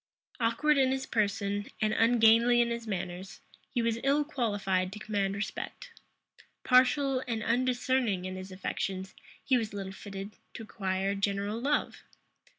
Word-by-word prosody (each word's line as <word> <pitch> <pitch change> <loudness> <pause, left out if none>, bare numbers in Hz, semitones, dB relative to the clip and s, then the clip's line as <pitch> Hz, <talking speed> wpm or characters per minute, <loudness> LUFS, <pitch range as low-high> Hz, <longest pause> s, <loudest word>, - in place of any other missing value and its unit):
Awkward 260 +6 +2
in 260 -1 +4
his 265 0 -1
person, 205 -3 -1
and 215 0 +1
ungainly 230 +1 +5
in 235 0 +3
his 235 -1 -4
manners, 185 -1 -5 0.3
he 240 -3 0
was 230 0 0
ill 280 +2 +3
qualified 205 - -1
to 205 - -7
command 200 -2 -1
respect; 345 - -5 0.7
partial 260 +1 +4
and 225 -3 -2
undiscerning 245 -4 +1
in 185 0 -4
his 185 +1 -8
affections, 190 0 -4 0.3
he 260 - +4
was 220 -3 -3
little 195 -1 -5
fitted 195 +1 -8 0.2
to 225 - -6
acquire 195 -2 -2
general 200 +2 -1
love. 290 +3 0
220 Hz, 145 wpm, -30 LUFS, 195-250 Hz, 0.7 s, ungainly